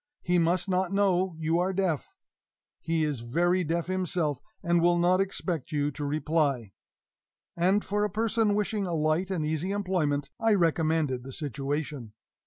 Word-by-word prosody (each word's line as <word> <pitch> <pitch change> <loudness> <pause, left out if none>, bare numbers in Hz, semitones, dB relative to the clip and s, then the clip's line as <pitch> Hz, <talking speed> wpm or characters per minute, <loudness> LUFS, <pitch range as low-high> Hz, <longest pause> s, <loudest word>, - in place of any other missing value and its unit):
He 180 0 +2
must 170 +3 +2
not 185 0 0
know 190 -3 +2
you 160 +1 +1
are 185 +2 0
deaf. 180 -7 -1 0.6
He 165 -1 0
is 150 -5 -1
very 175 +10 +1
deaf 165 +1 -1
himself, 175 -6 -1 0.2
and 170 0 +2
will 175 0 +4
not 180 +2 +3
expect 180 -6 -3
you 145 -1 0
to 145 - -6
reply." 145 -6 0 0.8
And, 190 +4 +2
for 205 +1 0
a 210 - +1
person 220 0 +1
wishing 210 -1 -1
a 170 - -1
light 155 +4 +1
and 175 -5 -1
easy 160 +4 -1
employment, 180 -8 -1
I 225 -2 +3
recommended 160 -6 +1
the 135 - -8
situation. 140 -3 -4
170 Hz, 160 wpm, -28 LUFS, 150-185 Hz, 0.8 s, will